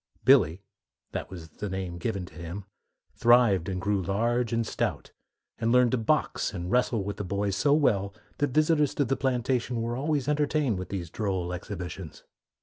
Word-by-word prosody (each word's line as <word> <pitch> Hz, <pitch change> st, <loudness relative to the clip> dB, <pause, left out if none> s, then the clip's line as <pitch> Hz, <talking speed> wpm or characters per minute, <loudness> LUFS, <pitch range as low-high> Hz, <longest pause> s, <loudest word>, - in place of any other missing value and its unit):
"Billy" 100 Hz, -, +5 dB, 0.5 s
that -, -, -4 dB
was 85 Hz, -4 st, -9 dB
the 100 Hz, +6 st, -6 dB
name 95 Hz, -2 st, -4 dB
given 100 Hz, 0 st, -2 dB
to -, -, -15 dB
him 85 Hz, +4 st, -7 dB, 0.5 s
thrived 115 Hz, -7 st, +4 dB
and 95 Hz, -1 st, -2 dB
grew 100 Hz, +1 st, 0 dB
large 115 Hz, +6 st, 0 dB
and 115 Hz, 0 st, 0 dB
stout, -, -, -3 dB, 0.5 s
and 115 Hz, 0 st, +1 dB
learned 125 Hz, -1 st, +5 dB
to 130 Hz, -, +2 dB
box 115 Hz, -3 st, 0 dB
and 90 Hz, 0 st, -4 dB
wrestle 120 Hz, -4 st, +2 dB
with 100 Hz, +1 st, -4 dB
the -, -, -3 dB
boys 100 Hz, +1 st, -1 dB
so 140 Hz, +8 st, +2 dB
well 100 Hz, -10 st, +2 dB, 0.3 s
that 145 Hz, -, +2 dB
visitors 150 Hz, +1 st, +2 dB
to 145 Hz, -, +2 dB
the 135 Hz, +2 st, 0 dB
plantation 125 Hz, -2 st, 0 dB
were 115 Hz, +1 st, -2 dB
always 145 Hz, 0 st, -1 dB
entertained 150 Hz, -7 st, +1 dB
with 95 Hz, -, -6 dB
these 85 Hz, -4 st, -5 dB
droll 95 Hz, -4 st, -2 dB
exhibitions. 90 Hz, -2 st, -7 dB
105 Hz, 175 wpm, -27 LUFS, 95-125 Hz, 0.5 s, Billy